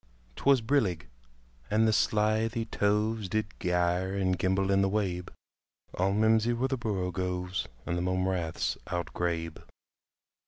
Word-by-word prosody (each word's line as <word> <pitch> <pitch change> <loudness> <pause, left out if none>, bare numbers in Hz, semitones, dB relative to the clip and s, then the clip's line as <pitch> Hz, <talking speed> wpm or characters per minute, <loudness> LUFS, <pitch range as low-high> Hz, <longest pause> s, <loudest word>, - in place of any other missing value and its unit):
'T - - -11
was 135 -3 +6
brillig, 110 - +1 0.6
and 110 +1 +3
the 110 - +3
slithy 110 +2 +1
toves 105 -1 0
Did 110 +2 0
gyre 90 +1 0
and 95 -2 +1
gimble 95 +1 +1
in 100 0 +4
the 100 - +2
wabe; 95 -4 -1 0.6
All 95 +2 +1
mimsy 110 +3 +3
were 120 +3 0
the 135 - +1
borogoves 90 -3 -2 0.2
And 85 0 -1
the - - -1
mome 95 +1 0
raths 80 -9 -1
outgrabe. 85 -2 -2
95 Hz, 140 wpm, -29 LUFS, 90-110 Hz, 0.6 s, was